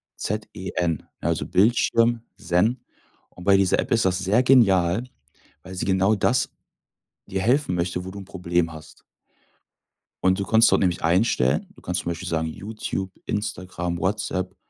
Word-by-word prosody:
Z 105 +1 -3
E 95 +1 -6
N, 85 -4 -1 0.2
also - - -1
Bildschirm 115 +3 +2
Zen. 105 +9 0 0.5
Und 90 - -13
bei 100 +1 +5
dieser 95 -2 +3
App - - -2
ist 115 -4 +3
das 90 -1 +2
sehr 100 +5 +2
genial, 100 -7 +4 0.6
weil 95 +1 -9
sie 90 - -3
genau 95 +2 +2
das 120 +5 +1 0.8
dir 95 - -3
helfen 125 -2 +2
möchte, 90 +1 -2
wo 95 - -6
du 100 - -9
'n 100 - -8
Problem 90 -3 -1
hast. 80 0 -13 1.2
Und 95 +1 +2
du 100 - -1
kannst 110 0 +5
dort - - +4
nämlich 90 -2 0
einstellen. 85 - +2
Du - - -17
kannst 90 0 -2
zum 85 - -2
Beispiel 85 - -6
sagen: 80 -1 -1
„Youtube, 95 +1 -5
Instagram, 90 -4 -3
WhatsApp, 95 -1 -2
95 Hz, 165 wpm, -24 LUFS, 90-105 Hz, 1.2 s, bei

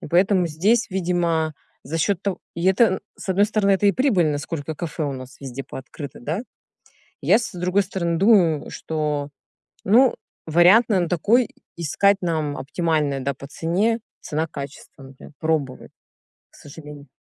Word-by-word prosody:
И - - -8
поэтому 180 +2 +3
здесь, 200 +10 +1
видимо, 170 -4 0 0.3
за 165 +4 -4
счет 190 +3 0
того, 200 -2 -2 0.2
и 170 - -4
это 190 +5 +5
н 190 -3 0 0.2
с - - -10
одной 195 +2 +4
стороны, 210 -2 +2
это 200 +2 +2
и 200 - +5
прибыльно, 185 - +2
насколько 145 +1 -4
кафе 165 0 -5
у 140 - -2
нас 130 0 -9
везде 135 0 -6
пооткрыто, 135 +2 -9
да. 160 - -3 0.8
Я, 215 - +4
с 235 - -5
другой 180 +3 +1
стороны, 170 -3 -2
думаю, 180 -6 +4
что, 150 -2 -3 0.6
ну, 245 +6 +5 0.3
вариант 180 +9 +5
нам 185 -5 +2
такой 210 +8 +2 0.3
искать, 195 +5 +2
нам 155 -4 -1
оптимальный, 150 -2 -1
да, 140 +1 -2
по 140 +2 -11
цене, 195 +10 0 0.2
цена-качество, 145 -3 -6
например, 135 +2 -13
пробовать, 155 -5 -2 0.6
к - - -20
сожалению. 145 -1 -12
170 Hz, 155 wpm, -22 LUFS, 150-195 Hz, 0.8 s, это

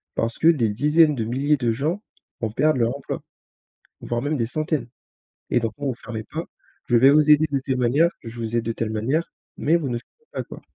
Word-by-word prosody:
Parce 115 0 -1
que 160 - +3
des 140 -10 +4
dizaines 150 +7 +4
de 115 -4 -2
milliers 140 +6 +1
de 120 -3 +1
gens 155 - -1 0.4
vont 110 -2 -2
perdre 150 +4 +2
leur 120 +2 +1
emploi, 140 - -5 0.8
voire 120 0 -2
même 145 +2 0
des 115 -4 0
centaines 150 -1 -2 0.6
et 125 - +3
donc 115 -2 -2
non, 145 - -3
vous 130 - 0
fermez 115 -2 -7
pas! 160 +9 -5 0.4
Je 120 - +1
vais 135 +4 +7
vous 150 +1 +4
aider 150 +1 +6
de 140 - +1
telle 130 -1 -2
manière, 130 +7 +3
je 115 0 -8
vous 115 0 -3
aide 115 - +1
de 115 - 0
telle 115 -1 -3
manière, 130 +10 -1 0.3
mais 160 - +2
vous 155 -6 0
ne 120 - -1
fermez 460 - -16
pas, - - -3
quoi!» - - -11
130 Hz, 230 wpm, -23 LUFS, 115-150 Hz, 0.8 s, vais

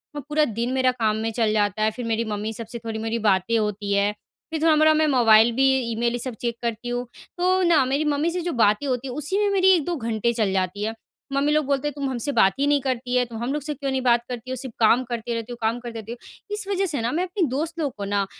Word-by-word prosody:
और 290 - -4
पूरा 300 0 +3
दिन 240 +2 0
मेरा 260 -1 +3
काम 220 -4 0
में 225 - -1
चल 225 -1 +1
जाता 210 0 +1
है। 215 - +2
फिर 245 +2 -6
मेरी 230 0 0
मम्मी 215 0 -3
सब 225 0 -6
से 235 +1 -7
थोड़ी 220 -1 -3
मेरी 225 +1 -2
बातें 195 +4 +2
होती 210 -1 -2
हैं, 200 +1 +2 0.4
फिर 320 -1 -3
थोड़ा-मोड़ा 310 -1 +5
मैं 310 0 +2
मोबाइल 235 -4 +5
भी 270 +1 +4 0.2
ईमेल, 235 +1 0
ये 245 - -2
सब 255 +1 -3
चेक 235 -1 -2
करती 235 0 -3
हूँ। 245 0 -2 0.3
तो 370 +1 +2
ना, 335 -5 +4
मेरी 275 +4 0
मम्मी 300 +2 +1
से 355 +1 -2
जो 345 +1 -2
बातें 210 +7 +1
होती 255 0 -2
हैं, 250 - -6
उसी 305 +7 -1
में 415 -1 +2
मेरी 380 -1 +5
1-2 345 +1 -1
घंटे 230 -3 -1
चल 215 -4 0
जाती 190 +2 -1
हैं। 220 +1 -2 0.4
मम्मी 280 +2 +2
लोग 305 -1 +2
बोलते 280 +1 0
हैं, 295 - -3
"तुम 280 -1 -3
हमसे 255 +2 -2
बात 195 -8 +4
ही 280 - +2
नहीं 290 -1 +3
करती 250 -1 -2
है। 250 - +4
तुम 235 -1 -9
हम 255 +3 -1
लोग 300 - -2
से 300 +1 -2
क्यों 275 -1 -4
नहीं 265 0 -1
बात 240 -2 +3
करती 245 0 -6
हो? 260 - -2
सिर्फ़ 255 -1 -5
काम 230 +3 +4
करती 240 -1 -4
रहती 230 +1 -4
हो, 240 - -6
काम 225 +2 0
करती 235 -2 -7
रहती 220 +1 -9
हो।" 240 - -6 0.4
इस 420 -1 -2
वजह 390 -1 0
से 300 -9 -1
ना, 235 +2 -1
मैं 340 +6 0
अपने 365 -2 -1
दोस्त 320 +6 -3
लोग 290 -5 -1
को 200 - -4
ना, 200 0 0
245 Hz, 280 wpm, -23 LUFS, 225-295 Hz, 0.4 s, थोड़ा-मोड़ा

